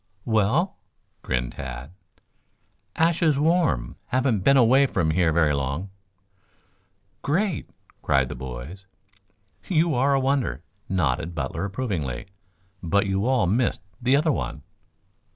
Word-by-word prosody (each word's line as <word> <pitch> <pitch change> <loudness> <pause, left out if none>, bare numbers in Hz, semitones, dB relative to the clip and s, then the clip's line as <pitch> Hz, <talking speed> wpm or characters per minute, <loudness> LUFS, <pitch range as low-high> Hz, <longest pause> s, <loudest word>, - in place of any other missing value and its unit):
"Well?" 115 - +1 0.4
grinned - - -2
Tad. 65 +3 -7 1.0
"Ashes 165 -2 +2
warm. 155 - +1
Haven't 130 -4 +1
been 140 +9 +4
away 130 +3 +5
from 80 -9 0
here 85 0 +2
very 75 -2 +3
long." 70 +7 -3 1.3
"Great!" 175 +3 -1 0.3
cried 65 -2 +2
the - - -5
boys. 65 +10 -8 0.8
"You 165 -2 +2
are 140 +2 +3
a - - +3
wonder," 130 - 0 0.3
nodded 85 -2 0
Butler 75 +5 -3
approvingly. 95 - -3 0.6
"But 100 +4 +1
you 95 +3 0
all 130 -6 +3
missed 110 -1 +1 0.2
the 125 +3 +3
other 155 +2 +3
one." 75 - -4
100 Hz, 115 wpm, -24 LUFS, -, 1.3 s, away